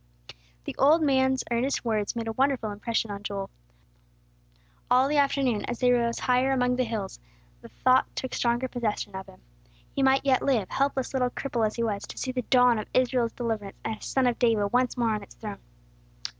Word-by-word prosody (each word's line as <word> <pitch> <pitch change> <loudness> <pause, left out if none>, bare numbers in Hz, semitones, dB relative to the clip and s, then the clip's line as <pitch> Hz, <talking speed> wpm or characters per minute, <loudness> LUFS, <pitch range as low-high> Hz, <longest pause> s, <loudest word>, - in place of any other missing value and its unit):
The - - -5
old 310 +4 +5
man's 265 -2 +2
earnest 250 +3 0
words 215 -2 -1
made 230 -1 -3
a - - -1
wonderful 255 -2 0
impression 225 +1 -2
on 200 0 -6
Joel. 200 -1 -5 1.4
All 255 +2 +4
the 295 +1 0
afternoon, 275 -5 +1
as 240 - -4
they 250 +1 +3
rose 235 -1 +1
higher 250 +1 +2
among 250 -1 +2
the 255 - +2
hills, 215 -4 -5 0.4
the - - -12
thought 255 0 +3
took 260 - -4
stronger 240 +2 0
possession 215 -5 -3
of 190 0 -7
him. - - -16 0.5
He 275 - -1
might 270 +1 +3
yet 265 -2 +3
live, 230 -9 +1
helpless 275 -1 -1
little 250 -2 +1
cripple 240 -3 -1
as 215 - -6
he 235 - -1
was, 205 -3 -2
to - - -10
see 260 - -2
the 255 0 -2
dawn 245 -1 +4
of 215 - -6
Israel's 250 -2 +2
deliverance, 220 -5 -4
and 220 - -2
a - - -23
son 265 -1 0
of 245 -1 +1
David 220 -4 +2
once 250 0 +1
more 230 -2 +1
on 210 - -3
its 200 - -14
throne. 210 -2 -7
245 Hz, 200 wpm, -27 LUFS, 220-260 Hz, 1.4 s, old